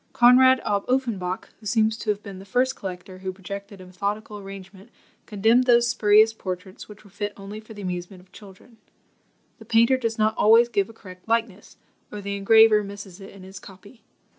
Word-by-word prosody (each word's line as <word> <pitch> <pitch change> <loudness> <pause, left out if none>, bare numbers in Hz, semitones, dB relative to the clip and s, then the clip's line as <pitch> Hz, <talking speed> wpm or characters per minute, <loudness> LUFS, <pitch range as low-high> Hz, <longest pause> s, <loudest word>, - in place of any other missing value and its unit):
Conrad 255 +2 +6
ab 200 -1 0
Uffenbach, 225 -9 -2
who 215 - -10
seems 220 +1 +1
to 215 - -5
have 210 0 -1
been 195 -2 -9
the - - -11
first 250 +6 0
collector 185 0 -8
who 190 0 -4
projected 200 +1 -9
a 185 - -12
methodical 205 +3 -5
arrangement, 195 +1 -12 0.4
condemned 225 +4 +2
those 240 -1 +4
spurious 215 0 +4
portraits 185 -1 -8
which 210 0 -14
were 200 - -19
fit 205 +1 -5
only 200 +2 -9
for 220 0 -14
the 205 - -9
amusement 180 +1 -6
of 185 - -29
children. 205 +4 -16 0.8
The - - -14
painter 230 +3 +3
does 230 -3 -3
not 215 0 +2
always 230 +3 +5
give 200 -3 -1
a - - -13
correct 185 -4 -14
likeness, 225 -3 -2 0.3
or 210 - -7
the 200 0 -5
engraver 215 +1 +5
misses 200 -1 -10
it 195 - -10
in 195 -1 -14
his 190 +1 -11
copy. 200 +5 -16
205 Hz, 190 wpm, -24 LUFS, 195-225 Hz, 0.8 s, Conrad